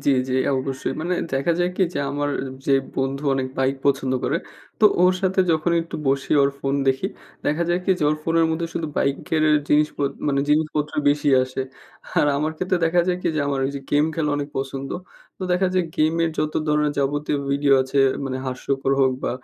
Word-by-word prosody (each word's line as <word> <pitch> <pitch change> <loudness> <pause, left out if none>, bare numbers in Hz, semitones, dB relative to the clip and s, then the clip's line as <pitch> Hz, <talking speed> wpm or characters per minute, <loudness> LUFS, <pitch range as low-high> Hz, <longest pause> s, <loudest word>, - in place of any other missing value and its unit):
জ্বি, - - +4 0.2
জ্বি, 130 - -1 0.2
অবশ্যই। 130 0 -2
মানে 175 +3 -1 0.2
দেখা 135 +6 +1
যায় 175 0 +1
কি? 190 - +2
যে, - - -1
আমার 145 0 -1 0.4
যে 140 - +3 0.2
বন্ধু 135 +1 -1
অনেক 130 -1 -1
বাইক 135 +1 +2
পছন্দ 135 -2 +1
করে। 150 - +1 0.4
তো - - +5 0.2
ওর 180 0 +6
সাথে 190 0 +2
যখন 160 +1 +1
একটু 165 - -7
বসি, 135 0 0
ওর 140 - +3
ফোন 135 0 -1
দেখি। 135 +7 +1 0.4
দেখা 150 +3 +1
যায় 175 +1 +2
কি? - - +1
যে, - - -3
ওর 155 - 0
ফোনের 165 +1 +2
মধ্যে 165 +1 -1
শুধু 160 - -2
বাইকের 145 +3 0 0.3
জিনিস 150 +1 +4
গুলো, 140 - +1 0.2
মানে 140 -1 +2
জিনিসপত্র 150 0 +1
বেশি 145 0 +2
আসে। 130 +1 -4 0.6
আর - - +4
আমার 155 +2 -1
ক্ষেত্রে 185 +2 0
দেখা 170 +2 +3
যায় 180 - +1
কি? - - -2
যে, - - +1
আমার 140 -1 -1
ওই 135 - 0
যে - - -5
গেম 145 +1 +4
খেলা 150 -2 0
অনেক 145 0 -3
পছন্দ। 135 0 -4 0.5
তো - - -7
দেখা 180 +2 +2
যায় 185 -1 +2
গেমের 165 +1 +2
যত 155 0 0 0.2
ধরনের 150 0 +2
যাবতীয় 145 +2 0
ভিডিও 140 0 +2
আছে, 130 +2 -2 0.3
মানে 130 -1 -3
হাস্যকর 135 +1 -1
হোক 130 -1 +4
বা - - 0
145 Hz, 205 wpm, -22 LUFS, 135-165 Hz, 0.6 s, ওর